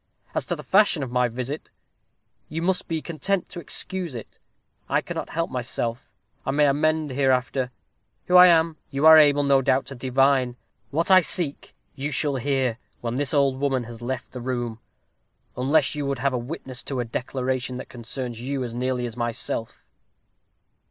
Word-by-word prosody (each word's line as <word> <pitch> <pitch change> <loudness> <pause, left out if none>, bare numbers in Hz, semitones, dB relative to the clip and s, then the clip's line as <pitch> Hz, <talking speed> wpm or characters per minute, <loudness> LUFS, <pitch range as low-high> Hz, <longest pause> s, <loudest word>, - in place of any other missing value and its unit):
As - - -2
to - - -1
the - - -9
fashion 195 -7 +3
of 125 - -5
my 125 0 +2
visit, 125 +5 -5 0.8
you 165 +2 -3
must 185 +1 0
be 160 -2 -2
content 175 +3 -2
to 175 - -7
excuse 175 -1 -4
it. 115 - -9 0.5
I - - +3
cannot - - -5
help 165 +1 -2
myself. 125 -1 -3 0.3
I - - -4
may 145 +2 +3
amend 155 +1 +1
hereafter. 130 -1 +1 0.6
Who 180 - +1
I 180 0 +10
am, 165 -2 +3
you 140 +2 -1
are 160 0 +10
able, 145 -1 +5
I 140 -1 +4
doubt 130 - +3
not, 135 - -2
to 135 - -8
divine. 130 0 +2 0.3
What 165 +8 0
I 185 0 +8
seek, 165 -4 0 0.2
you 140 +1 -4
shall 145 -2 0
hear, 130 -2 0 0.2
when 120 +1 -3
this 145 -1 +1
old 140 -2 +2
woman 135 -3 0
has 115 0 -10
left 130 +2 -4
the 125 - -7
room, 120 -2 -3 0.8
unless 140 +3 +2
you 145 -2 -3
would 140 -1 -1
have 135 +2 0
a - - +1
witness 130 0 -5
to 135 -3 -3
a 120 - -1
declaration 125 +2 -3
that - - -7
concerns 120 0 -5
you 135 +1 -2
as 120 -2 -5
nearly 125 0 -1
as 115 -2 -6
myself." 115 -1 -3
135 Hz, 180 wpm, -24 LUFS, 125-150 Hz, 0.8 s, I